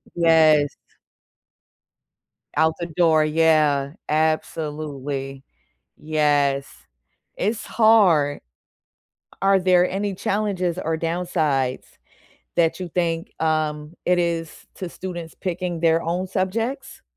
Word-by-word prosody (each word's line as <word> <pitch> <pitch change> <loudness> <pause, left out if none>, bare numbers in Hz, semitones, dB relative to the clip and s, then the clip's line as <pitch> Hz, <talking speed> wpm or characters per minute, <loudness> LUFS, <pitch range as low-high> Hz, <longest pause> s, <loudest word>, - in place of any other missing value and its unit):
Yes. 155 -4 +4 1.8
Out 160 0 +3
the 170 - -3
door. 160 -2 +3
Yeah, 155 -3 +2 0.2
absolutely. 150 -3 -2 0.5
Yes, 145 -3 +1 0.7
it's 215 +3 -2
hard. 195 -11 +4 1.0
Are 195 0 +4
there 180 -1 +3
any 200 +1 -2
challenges 185 -3 -1
or 160 -2 -1
downsides 160 -6 -1 0.7
that 165 -2 +2
you 180 - -4
think, 165 -1 -2
um, 155 -1 -1
it 180 0 +3
is 170 -2 -3
to 185 - -5
students 175 -2 -7
picking 180 -2 -4
their 165 0 +3
own 175 +3 -2
subjects? 225 +9 -3
165 Hz, 95 wpm, -22 LUFS, 150-180 Hz, 1.8 s, Yes